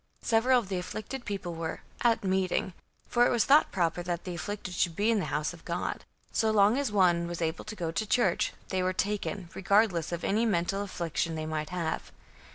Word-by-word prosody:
Several 245 +3 +4
of 235 -5 -1
the 185 -2 -1
afflicted 215 +8 -6
people 195 -5 -4
were 165 -1 -4 0.2
"at 235 -3 +3
meeting," 190 -1 0 0.3
for 240 0 +4
it - - +1
was 235 -3 +2
thought 290 +3 +5
proper 175 -1 0
that 175 -1 -3
the 180 - -5
afflicted 185 +2 -5
should 175 -1 0
be 210 +4 +2
in 220 - +2
the - - -1
house 150 +3 -1
of 170 - -14
God. 170 0 -3 0.3
So 220 - +2
long 210 +1 +5
as 275 -4 0
one 175 -4 +3
was 175 0 -5
able 160 0 -2
to 215 - -6
go 170 -5 -3
to 215 +6 -2
church, 200 -6 +2 0.2
they 185 - 0
were 185 0 +1
taken, 200 -2 -2
regardless 195 -4 +2
of 170 0 -4
any 215 +3 +2
mental 195 -2 +1
affection 170 -4 -2
they 155 0 -3
might 155 -1 -3
have. 170 -3 -3
185 Hz, 210 wpm, -29 LUFS, 170-215 Hz, 0.3 s, thought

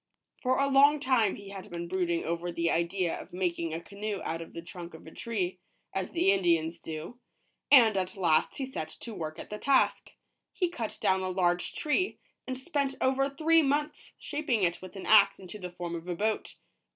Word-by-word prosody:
For 255 0 +2
a 275 - +3
long 280 +2 +6
time 255 -7 +2
he 200 -1 -10
had 195 -1 -8
been 170 0 -5
brooding 175 -2 0
over 170 +1 -2
the 170 0 0
idea 170 +1 0
of - - -14
making 170 -2 -1
a 160 - -3
canoe 200 +3 -5
out 165 +1 -3
of 165 - -10
the 170 - -6
trunk 170 -1 -9
of 160 - -13
a 160 - -10
tree, 185 -5 -3 0.3
as 190 -1 -2
the 330 - +3
Indians 170 -4 +2
do; 165 +10 -7 0.5
and 235 -7 +7
at 185 0 -2
last 170 -5 +2
he 270 - -2
set 210 -12 -5
to 230 - -8
work 155 -5 -5
at - - -9
the 210 - -4
task. 275 -1 +2 0.4
He 360 -3 0
cut 235 -11 -5
down 190 0 +2
a 185 - -2
large 180 -1 +1
tree, 365 +6 0 0.3
and 260 0 -3
spent 275 -1 -1
over 270 +1 +2
three 325 +3 +4
months 295 +1 -1
shaping 290 -8 -1
it 175 -1 +1
with 185 +1 -10
an 195 - -7
axe 200 -2 +6
into 190 +2 -9
the 180 -2 -5
form 175 -1 -6
of 170 +1 -6
a 175 - -2
boat. 215 +4 -1
195 Hz, 205 wpm, -29 LUFS, 170-260 Hz, 0.5 s, and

